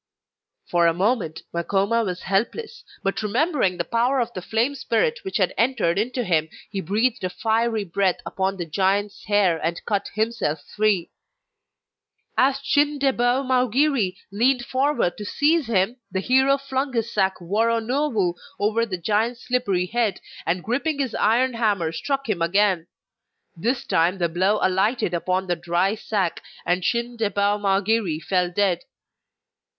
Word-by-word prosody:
For 170 Hz, -1 st, +3 dB
a 165 Hz, -, +2 dB
moment 190 Hz, -4 st, 0 dB
Makoma 200 Hz, +6 st, +1 dB
was 180 Hz, -3 st, -4 dB
helpless, 435 Hz, -, -2 dB, 0.2 s
but 195 Hz, +2 st, -1 dB
remembering 215 Hz, -, +1 dB
the -, -, 0 dB
power 245 Hz, +3 st, +1 dB
of 240 Hz, -1 st, -1 dB
the 185 Hz, -, -5 dB
flame 225 Hz, +8 st, 0 dB
spirit 470 Hz, -, 0 dB
which 385 Hz, -, -3 dB
had 185 Hz, -4 st, +1 dB
entered 225 Hz, -7 st, +2 dB
into 250 Hz, +3 st, -1 dB
him, 160 Hz, -5 st, +1 dB, 0.2 s
he 195 Hz, -2 st, -2 dB
breathed 215 Hz, +6 st, 0 dB
a 185 Hz, -, 0 dB
fiery 225 Hz, +2 st, 0 dB
breath 190 Hz, 0 st, 0 dB
upon 190 Hz, 0 st, -2 dB
the 175 Hz, -, -3 dB
giant's 195 Hz, +5 st, 0 dB
hair 200 Hz, -5 st, +2 dB
and 165 Hz, +1 st, -2 dB
cut 200 Hz, -2 st, -1 dB
himself 215 Hz, -9 st, -1 dB
free. 205 Hz, -5 st, +1 dB, 1.2 s
As 270 Hz, +1 st, +3 dB
Chin 290 Hz, +1 st, +2 dB
debou 265 Hz, -1 st, +1 dB
Mau 255 Hz, 0 st, +2 dB
giri 255 Hz, -6 st, +1 dB
leaned 240 Hz, +4 st, +2 dB
forward 265 Hz, -9 st, 0 dB
to -, -, -5 dB
seize 300 Hz, +5 st, +2 dB
him 220 Hz, +2 st, +1 dB
the 190 Hz, -, -1 dB
hero 265 Hz, +6 st, +3 dB
flung 275 Hz, 0 st, -3 dB
his 230 Hz, -1 st, -1 dB
sack 190 Hz, -2 st, +2 dB
Woronowu 225 Hz, -, 0 dB, 0.3 s
over 220 Hz, +3 st, +1 dB
the 185 Hz, -4 st, -3 dB
giant's 220 Hz, +6 st, 0 dB
slippery 235 Hz, -8 st, 0 dB
head, 220 Hz, 0 st, 0 dB, 0.3 s
and 175 Hz, +1 st, 0 dB
gripping 280 Hz, +6 st, -1 dB
his 265 Hz, -5 st, -2 dB
iron 245 Hz, +4 st, +2 dB
hammer, 205 Hz, -8 st, 0 dB
struck 275 Hz, -, -2 dB
him 200 Hz, -6 st, -1 dB
again; 180 Hz, 0 st, +2 dB, 0.7 s
this 240 Hz, +9 st, -1 dB
time 170 Hz, +4 st, +2 dB
the 175 Hz, -2 st, +1 dB
blow 190 Hz, +5 st, +2 dB
alighted 190 Hz, +1 st, +1 dB
upon 185 Hz, +2 st, 0 dB
the 175 Hz, -1 st, 0 dB
dry 175 Hz, +3 st, 0 dB
sack 205 Hz, -5 st, -2 dB, 0.2 s
and 180 Hz, +1 st, +1 dB
Chin 235 Hz, +4 st, -1 dB
debou 205 Hz, -1 st, +1 dB
Mau 195 Hz, -1 st, +2 dB
giri 205 Hz, -6 st, 0 dB
fell 180 Hz, +2 st, 0 dB
dead. 180 Hz, -1 st, +1 dB
210 Hz, 155 wpm, -23 LUFS, 185-245 Hz, 1.2 s, For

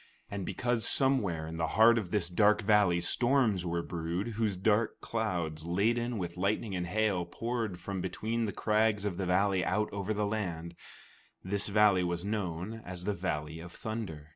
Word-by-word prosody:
And 100 Hz, -2 st, -4 dB
because 120 Hz, -2 st, 0 dB
somewhere 105 Hz, -13 st, +2 dB
in 80 Hz, +1 st, -6 dB
the 80 Hz, -1 st, 0 dB
heart 115 Hz, +1 st, +7 dB
of 95 Hz, -6 st, -5 dB
this 95 Hz, -3 st, +1 dB
dark 105 Hz, +4 st, +3 dB
valley 100 Hz, -4 st, +4 dB
storms 120 Hz, -8 st, +2 dB
were 85 Hz, 0 st, -1 dB
brewed, 85 Hz, +6 st, -3 dB
whose 110 Hz, -3 st, -1 dB
dark 105 Hz, +3 st, +1 dB
clouds, 85 Hz, -9 st, -2 dB
laden 115 Hz, +7 st, 0 dB
with 85 Hz, -2 st, -4 dB
lightning 100 Hz, +2 st, -1 dB
and 90 Hz, -1 st, -2 dB
hail, 100 Hz, -1 st, +1 dB
poured 110 Hz, +1 st, -3 dB
from 95 Hz, +1 st, -4 dB
between 115 Hz, +4 st, -2 dB
the 105 Hz, -, -2 dB
crags 105 Hz, -1 st, +1 dB
of 95 Hz, -4 st, -2 dB
the 95 Hz, -, -2 dB
valley 95 Hz, +1 st, +2 dB
out 105 Hz, +5 st, 0 dB
over 100 Hz, +1 st, -3 dB
the 105 Hz, 0 st, 0 dB
land, 90 Hz, -6 st, -3 dB, 0.7 s
this 100 Hz, +2 st, -1 dB
valley 105 Hz, -2 st, +4 dB
was 85 Hz, +1 st, -2 dB
known 100 Hz, +1 st, -3 dB
as 90 Hz, -1 st, -6 dB
the 105 Hz, +2 st, 0 dB
Valley 80 Hz, -4 st, -3 dB
of 85 Hz, +1 st, -9 dB
Thunder. 95 Hz, -10 st, -6 dB
100 Hz, 175 wpm, -31 LUFS, 85-110 Hz, 0.7 s, heart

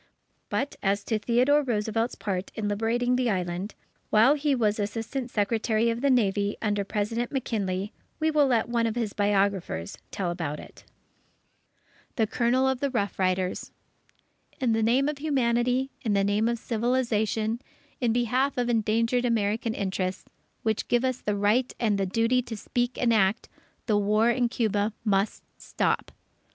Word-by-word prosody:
But 280 Hz, +1 st, -2 dB
as 200 Hz, +1 st, +1 dB
to 220 Hz, -2 st, -1 dB
Theodore 250 Hz, +7 st, +3 dB
Roosevelt's 225 Hz, -2 st, -1 dB
part 190 Hz, -2 st, -3 dB
in 215 Hz, -2 st, -2 dB
liberating 230 Hz, +4 st, +1 dB
the 250 Hz, -2 st, +1 dB
Island, 180 Hz, +1 st, -2 dB, 0.3 s
while 225 Hz, +6 st, +6 dB
he 295 Hz, -1 st, +1 dB
was 215 Hz, -3 st, +1 dB
Assistant 225 Hz, +5 st, -3 dB
Secretary 220 Hz, +1 st, +1 dB
of 230 Hz, +1 st, -4 dB
the 280 Hz, -, +2 dB
Navy 205 Hz, -5 st, +2 dB
under 205 Hz, -2 st, 0 dB
President 220 Hz, +4 st, -2 dB
McKinley, 205 Hz, -7 st, -2 dB, 0.3 s
we 315 Hz, 0 st, +2 dB
will 295 Hz, -2 st, +4 dB
let 235 Hz, -4 st, +2 dB
one 235 Hz, -1 st, +1 dB
of 225 Hz, -, -2 dB
his 230 Hz, -4 st, -2 dB
biographers 195 Hz, -, 0 dB
tell 180 Hz, -3 st, -2 dB
about 160 Hz, -4 st, -4 dB
it: -, -, -13 dB, 1.3 s
THE 225 Hz, -5 st, +2 dB
COLONEL 245 Hz, +4 st, +1 dB
OF 265 Hz, -1 st, 0 dB
THE 280 Hz, -, 0 dB
ROUGH 205 Hz, -6 st, -1 dB
RIDERS 185 Hz, 0 st, 0 dB, 0.9 s
_In 250 Hz, -4 st, +2 dB
the 225 Hz, -, +1 dB
name 245 Hz, +5 st, +3 dB
of 295 Hz, -1 st, -3 dB
humanity, 255 Hz, -2 st, +1 dB
in 220 Hz, -4 st, 0 dB
the 200 Hz, -1 st, +3 dB
name 205 Hz, +3 st, +1 dB
of 235 Hz, 0 st, 0 dB
civilization, 230 Hz, -1 st, 0 dB, 0.4 s
in 240 Hz, -4 st, +1 dB
behalf 245 Hz, +4 st, +1 dB
of 245 Hz, -1 st, 0 dB
endangered 230 Hz, +2 st, +1 dB
American 225 Hz, -1 st, 0 dB
interests, 190 Hz, -1 st, -2 dB, 0.4 s
which 220 Hz, -1 st, -1 dB
give 240 Hz, +1 st, +2 dB
us 255 Hz, -1 st, -1 dB
the 210 Hz, -, -1 dB
right 220 Hz, +6 st, +2 dB
and 215 Hz, -4 st, +1 dB
the 195 Hz, -, 0 dB
duty 230 Hz, +5 st, +2 dB
to 230 Hz, -2 st, -7 dB
speak 245 Hz, +3 st, -2 dB
and 235 Hz, -2 st, +3 dB
act, 210 Hz, +1 st, +2 dB, 0.4 s
the 210 Hz, -3 st, +2 dB
war 215 Hz, +3 st, +3 dB
in 240 Hz, 0 st, +1 dB
Cuba 215 Hz, -3 st, 0 dB
must 200 Hz, 0 st, +1 dB, 0.2 s
stop. -, -, -1 dB
225 Hz, 160 wpm, -27 LUFS, 205-245 Hz, 1.3 s, while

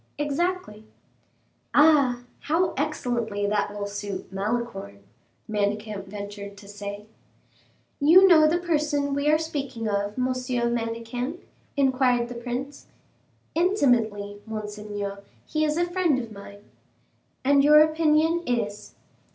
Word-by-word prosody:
"Exactly." 295 Hz, -, -2 dB, 0.9 s
"Ah, 285 Hz, -5 st, +5 dB, 0.2 s
how 335 Hz, +5 st, 0 dB
excellently 240 Hz, -8 st, -2 dB
that 205 Hz, 0 st, 0 dB
will 205 Hz, 0 st, -4 dB
suit 200 Hz, -1 st, -6 dB
Malicorne," 195 Hz, -, -3 dB, 0.4 s
Manicamp 210 Hz, -1 st, -2 dB
ventured 200 Hz, 0 st, -8 dB
to 205 Hz, -1 st, -13 dB
say. 205 Hz, 0 st, -7 dB, 0.9 s
"You 340 Hz, +6 st, +7 dB
know 315 Hz, -4 st, +7 dB
the 325 Hz, +3 st, +2 dB
person 300 Hz, -4 st, 0 dB
we 285 Hz, +1 st, +1 dB
are 305 Hz, -, +5 dB
speaking 275 Hz, -7 st, -4 dB
of, 205 Hz, +1 st, -2 dB
M. 255 Hz, -, +1 dB
Manicamp?" 240 Hz, +2 st, -2 dB, 0.4 s
inquired 255 Hz, -3 st, +2 dB
the -, -, -5 dB
prince. 250 Hz, +4 st, -6 dB, 0.7 s
"Intimately, 230 Hz, -, +1 dB
monseigneur. 210 Hz, -2 st, -5 dB, 0.2 s
He 310 Hz, 0 st, -1 dB
is 305 Hz, 0 st, 0 dB
a 345 Hz, -, +2 dB
friend 350 Hz, -5 st, +1 dB
of 235 Hz, -3 st, -5 dB
mine." 200 Hz, 0 st, -11 dB, 0.8 s
"And 280 Hz, +1 st, +4 dB
your 300 Hz, +1 st, +8 dB
opinion 315 Hz, +1 st, +3 dB
is?" 210 Hz, -4 st, -3 dB
245 Hz, 115 wpm, -25 LUFS, 205-300 Hz, 0.9 s, your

